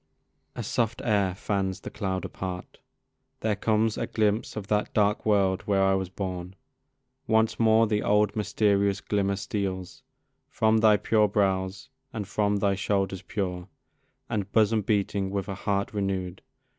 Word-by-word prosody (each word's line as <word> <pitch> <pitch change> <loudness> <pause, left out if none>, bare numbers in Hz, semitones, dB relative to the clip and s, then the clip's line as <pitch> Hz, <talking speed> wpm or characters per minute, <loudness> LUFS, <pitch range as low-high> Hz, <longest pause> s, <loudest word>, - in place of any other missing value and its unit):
A - - -4
soft 115 -1 -1
air 100 -5 +2
fans 95 -1 -2
the - - -7
cloud 95 -2 -3
apart; 90 -1 -6 0.6
there 110 -1 +1
comes 110 +1 +1
A - - -2
glimpse 105 0 0
of 105 -3 -5
that 105 +1 0
dark 105 +1 +2
world 95 -3 +3
where 100 -1 +3
I 95 0 +4
was 95 -1 -1
born. 90 -1 -5 0.7
Once 110 0 +2
more 110 0 +5
the 105 -1 0
old 105 -1 +2
mysterious 100 -2 +1
glimmer 100 -1 0
steals 95 -2 -4 0.5
From 110 0 +2
thy 110 -1 +5
pure 105 0 +3
brows, 95 0 0 0.2
and 105 -4 -5
from 105 0 +1
thy 100 -1 +2
shoulders 95 -1 -1
pure, 90 -2 -4 0.6
And 105 -4 -3
bosom 110 0 +3
beating 100 -1 0
with 100 0 -3
a 100 - -3
heart 100 +1 -2
renew'd. 95 -3 -2
100 Hz, 150 wpm, -27 LUFS, 95-105 Hz, 0.7 s, more